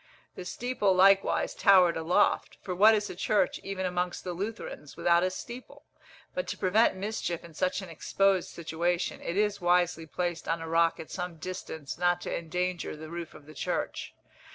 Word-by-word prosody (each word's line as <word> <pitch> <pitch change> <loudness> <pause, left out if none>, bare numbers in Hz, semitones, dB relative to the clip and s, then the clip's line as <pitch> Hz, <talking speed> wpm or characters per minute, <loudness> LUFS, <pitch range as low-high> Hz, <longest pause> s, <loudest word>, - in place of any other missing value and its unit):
The 180 - -8
steeple 210 -2 0
likewise 195 +1 +4
towered 185 -4 +5
aloft, 170 +5 +1
for 185 - -3
what 215 +5 +6
is 210 -1 -1
a - - -8
church, 205 +3 +1
even 195 -1 -4
amongst 180 0 -2
the 180 - -4
Lutherans, 195 -6 -6
without 170 0 +4
a 185 - +2
steeple? 235 +7 -9 0.5
But - - -3
to - - -4
prevent 200 +3 +3
mischief 190 -3 -3
in 170 -1 -12
such 185 +4 -1
an 185 - -9
exposed 190 +3 +1
situation, 170 +2 -2
it 170 - -3
is 210 -1 +1
wisely 175 -2 +2
placed 175 +1 -3
on 165 0 0
a 165 - -6
rock 165 0 +2
at 160 - -9
some 180 -1 -4
distance 160 -3 -6
not 175 0 +2
to - - -3
endanger 180 +1 -2
the 155 +1 -9
roof 170 -1 -6
of 145 - -14
the 155 - -12
church. - - -3
180 Hz, 180 wpm, -29 LUFS, 170-195 Hz, 0.5 s, what